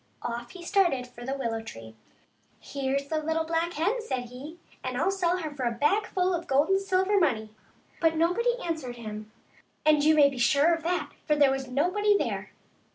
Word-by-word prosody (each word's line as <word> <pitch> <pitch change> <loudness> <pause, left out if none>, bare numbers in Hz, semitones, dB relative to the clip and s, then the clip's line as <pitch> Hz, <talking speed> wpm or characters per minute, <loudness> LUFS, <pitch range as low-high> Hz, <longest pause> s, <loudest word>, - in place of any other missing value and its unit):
Off 240 0 -4
he 365 -2 -11
started 345 -9 +2
for 245 -1 -12
the 265 +2 -3
willow 230 -4 -2
tree. 115 - -10 0.4
" - - -39
Here's 275 0 -2
the 310 +1 -1
little 320 +1 0
black 330 +1 -1
hen," 405 +11 0
said 255 - -4
he, 280 +7 -9
" - - -28
and - - -3
I'll 385 - +2
sell 365 -2 +1
her 315 -4 -4
for 275 -3 -4
a 235 - +1
bagful 370 - +1
of 345 0 -3
gold 280 +5 +2
and 385 0 +3
silver 390 +1 +2
money." 220 - 0 0.5
But 325 -1 +2
nobody 360 +10 +2
answered 310 -8 -4
him; 215 -2 -8 0.5
and 305 -1 +4
you 310 +1 +5
may 290 -2 +7
be 270 -3 -5
sure 285 +7 +4
of 330 - -2
that, 350 +3 -2 0.2
for 300 - +3
there 285 -2 +5
was 270 -1 -3
nobody 365 +10 +2
.there. - - -3
310 Hz, 205 wpm, -27 LUFS, 260-355 Hz, 0.5 s, may